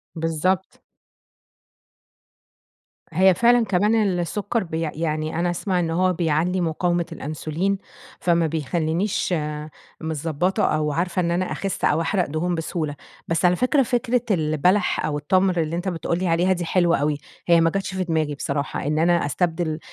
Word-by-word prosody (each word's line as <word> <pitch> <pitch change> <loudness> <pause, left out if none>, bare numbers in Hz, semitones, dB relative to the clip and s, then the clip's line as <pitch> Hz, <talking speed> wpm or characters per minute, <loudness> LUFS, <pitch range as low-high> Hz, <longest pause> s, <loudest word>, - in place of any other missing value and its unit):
بالضبط. 165 +3 -1 2.3
هي 190 0 +5
فعلًا 235 +5 +4
كمان 205 +3 +2 0.2
السكر 205 +6 -1
بيع 165 -2 -3
يعني 155 0 -2
أنا 175 +1 +1
أسمع 180 +1 -1
إن 170 -2 0
هوّ 185 +2 +2
بيعلّي 170 +2 0
مقاومة 175 +1 0
الأنسولين، 155 +6 -2 0.4
فما 170 -2 +2
بيخلينيش 165 +5 -1 0.7
متضبطة 160 +3 -1
أو 155 -1 +1
عارفة 175 +4 -1
إن 170 -1 +1
أنا 180 +2 -1
أخس 195 -1 -2
أو 165 - +2
أحرق 180 +2 +1
دهون 165 +4 -1
بسهولة. 160 -2 -3 0.3
بس 165 +2 +1
على 180 0 +5
فكرة، 260 - +2
فكرة 245 0 0
البلح 175 +3 +2
أو 150 -1 -1
التَمْر، 185 +5 +2
اللي 160 +1 -2
أنت 175 +3 -3
بتقول 170 -1 -1
لي 185 - -1
عليها 175 +3 +3
دي 175 -1 -3
حلوة 170 0 +2
أوي، 145 +1 0 0.3
هيّ 170 -1 +5
ما 165 - +4
جاتش 195 +2 -3
في 190 - 0
دماغي 160 -4 -1
بصراحة، 140 0 -3
إن 150 +1 +1
أنا 170 0 +3
أستبدل 160 +1 -1
170 Hz, 150 wpm, -23 LUFS, 160-185 Hz, 2.3 s, هي